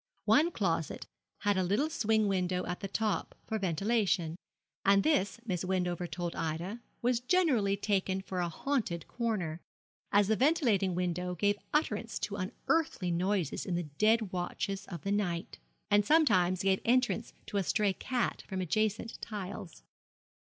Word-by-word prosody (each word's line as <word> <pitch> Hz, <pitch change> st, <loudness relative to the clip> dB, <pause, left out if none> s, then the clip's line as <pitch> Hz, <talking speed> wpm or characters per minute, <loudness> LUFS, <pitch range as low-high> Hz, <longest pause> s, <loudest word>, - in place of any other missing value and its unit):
One 315 Hz, +4 st, +5 dB
closet 170 Hz, -, -1 dB, 0.4 s
had 205 Hz, -1 st, +2 dB
a 185 Hz, -, +2 dB
little 210 Hz, -, +1 dB
swing 220 Hz, -6 st, +2 dB
window 180 Hz, -2 st, 0 dB
at 180 Hz, -, -4 dB
the 195 Hz, -, -4 dB
top 215 Hz, +1 st, -1 dB
for 220 Hz, -, -2 dB
ventilation, 190 Hz, -2 st, +1 dB, 0.5 s
and 195 Hz, 0 st, +5 dB
this, 230 Hz, -9 st, +2 dB
Miss 185 Hz, -5 st, -2 dB
Wendover 180 Hz, -1 st, -1 dB
told 175 Hz, -1 st, -4 dB
Ida, 170 Hz, +8 st, -3 dB, 0.2 s
was 245 Hz, -1 st, +3 dB
generally 250 Hz, -, +2 dB
taken 195 Hz, -2 st, 0 dB
for 190 Hz, -1 st, -4 dB
a 175 Hz, -1 st, 0 dB
haunted 195 Hz, -, -2 dB
corner, 190 Hz, -9 st, -2 dB, 0.5 s
as 205 Hz, -1 st, +4 dB
the 220 Hz, -, +3 dB
ventilating 230 Hz, -, +2 dB
window 180 Hz, 0 st, -1 dB
gave 205 Hz, +3 st, +1 dB
utterance 230 Hz, -7 st, 0 dB
to 200 Hz, -, -3 dB
unearthly 195 Hz, -, -1 dB
noises 180 Hz, -2 st, 0 dB
in 180 Hz, -, -2 dB
the 175 Hz, -, -1 dB, 0.2 s
dead 220 Hz, -2 st, +3 dB
watches 195 Hz, +2 st, -3 dB
of 170 Hz, -5 st, -7 dB
the 200 Hz, -, -1 dB
night, 180 Hz, -4 st, -1 dB, 0.3 s
and 205 Hz, 0 st, +5 dB
sometimes 185 Hz, -, +4 dB
gave 190 Hz, -1 st, +2 dB
entrance 240 Hz, -1 st, +1 dB
to 205 Hz, -, -3 dB
a 195 Hz, -, +2 dB
stray 205 Hz, +2 st, +2 dB
cat 250 Hz, +5 st, -2 dB
from 190 Hz, -2 st, -3 dB
adjacent 215 Hz, +5 st, -1 dB
tiles. 200 Hz, -4 st, -6 dB
200 Hz, 150 wpm, -31 LUFS, 180-220 Hz, 0.5 s, One